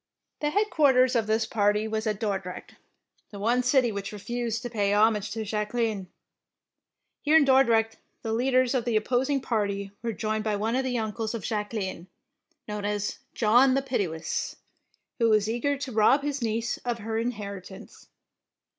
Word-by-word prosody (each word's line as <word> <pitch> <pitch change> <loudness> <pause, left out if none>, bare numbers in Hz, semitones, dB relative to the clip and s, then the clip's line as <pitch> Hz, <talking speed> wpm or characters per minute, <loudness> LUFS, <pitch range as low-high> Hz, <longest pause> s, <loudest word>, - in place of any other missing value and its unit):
The 295 - 0
headquarters 285 -10 +3
of 225 -2 +1
this 220 +1 +1
party 210 -1 +1
was 220 0 -2
at 210 -2 -1
Dordrecht, 195 -4 -4 0.6
the 205 - -10
one 235 +5 +2
city 250 -1 +3
which 200 -1 -5
re 210 - -7
fused 235 +2 -3
to 245 - -4
pay 205 -3 +1
homage 210 -1 +3
to 225 -1 -4
Jacqueline. 210 -1 -2 1.1
Here 305 +2 +5
in 300 - +5
Dordrecht 235 -5 +3 0.3
the 225 - -2
leaders 255 +1 +2
of 250 -3 0
the 235 -2 0
opposing 260 +5 +1
party 200 -5 -2
were 235 - -2
joined 215 +1 -2
by 215 -1 0
one 220 +3 -1
of 265 - +1
the 250 -2 -1
uncles 220 0 -3
of 220 - -5
Jacqueline, 205 -4 -3 0.6
known 210 -1 -4
as 205 0 -2 0.2
''John 245 +4 +5
the 270 - +1
Pitiless,'' 180 -11 -2 0.6
who 230 -1 +4
was 215 -1 +3
eager 240 +5 0
to 270 -1 -5
rob 225 +6 +4
his 285 -2 -2
niece 230 +1 -1
of 240 -1 -3
her 220 0 -3
inheritance. 200 -5 -6
225 Hz, 165 wpm, -27 LUFS, 210-250 Hz, 1.1 s, Here